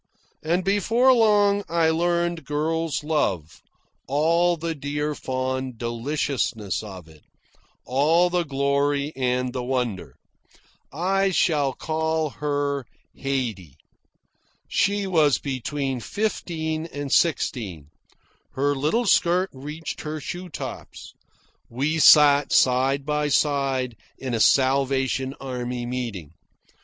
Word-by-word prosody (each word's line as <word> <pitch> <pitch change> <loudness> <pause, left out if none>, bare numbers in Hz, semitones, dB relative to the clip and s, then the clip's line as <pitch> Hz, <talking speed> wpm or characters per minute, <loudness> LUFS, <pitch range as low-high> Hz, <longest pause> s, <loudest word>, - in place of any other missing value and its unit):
And 170 +4 0
before 225 +7 +3
long 205 -3 +3
I 165 -1 +2
learned 170 0 0
girl's 160 +1 -2
love, 95 - -1 0.5
all 170 +5 +2
the 165 +1 -3
dear 145 +1 -3
fond 130 -2 -3
deliciousness 120 -3 -2
of 95 -6 -10
it, 80 -2 -18 0.6
all 160 +7 +3
the 180 0 +1
glory 140 0 0
and 125 -1 -1
the 130 - -3
wonder. 120 - -3 0.8
I 195 +6 +1
shall 150 -7 +1
call 160 +1 -1
her 145 -1 -2 0.3
Haydee. 115 - -3 0.9
She 200 +1 +1
was 155 -7 +3
between 135 0 -3
fifteen 160 - -3
and 145 -4 -6
sixteen. 100 - 0 0.6
Her 145 +2 +1
little 155 - 0
skirt 180 0 +3
reached 150 +5 -7
her 155 0 -5
shoe 175 +5 -6
tops. - - -8 0.6
We 145 +7 -1
sat 145 -2 +7
side 135 +2 +3
by 150 0 0
side 135 -4 0 0.2
in 130 -2 -5
a 115 - 0
Salvation 135 +1 +2
Army 125 -2 -4
meeting. 115 - -5
145 Hz, 105 wpm, -24 LUFS, 130-165 Hz, 0.9 s, sat